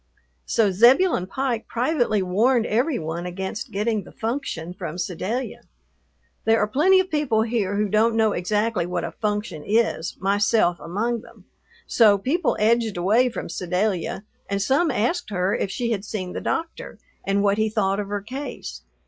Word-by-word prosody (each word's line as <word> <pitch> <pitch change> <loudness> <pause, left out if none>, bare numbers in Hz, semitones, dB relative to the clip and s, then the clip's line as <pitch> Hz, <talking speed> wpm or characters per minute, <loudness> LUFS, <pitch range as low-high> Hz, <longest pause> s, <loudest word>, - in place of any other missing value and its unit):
So 220 -4 +2
Zebulon 240 - +4
Pike 245 +1 -2
privately 240 -5 0
warned 225 +6 +2
every 250 +7 +1
one 165 +2 -4
against 190 +4 -5
getting 210 +1 -1
the - - -14
"function" 220 - -4
from 175 -3 -6
Sedalia. 190 +8 -3 0.8
There 225 0 +3
are 210 - +2
plenty 330 - +4
of 375 -1 -1
people 265 -8 +1
here 220 -4 -1
who 210 +1 +1
don't 220 +3 +2
know 220 -1 +3
exactly 210 +1 0
what 175 -1 -2
a 170 - -4
function 205 -5 -3
is, 215 -5 0
myself 200 -2 +2
among 225 +7 -2
them. - - -17 0.4
So 215 -4 +5
people 285 - 0
edged 225 -1 +2
away 220 +8 +3
from 235 - -6
Sedalia, 185 +1 -2 0.3
and 200 0 -1
some 275 - +2
asked 250 - -1
her 190 0 0
if - - -2
she 235 +4 -2
had 200 -3 -1
seen 190 -4 -5
the - - -4
doctor 330 0 -4 0.3
and 200 +1 +1
what 200 +1 +2
he 220 0 +2
thought 200 -2 0
of 205 - -3
her 205 0 -3
case. 260 +6 -7
215 Hz, 165 wpm, -23 LUFS, 190-235 Hz, 0.8 s, So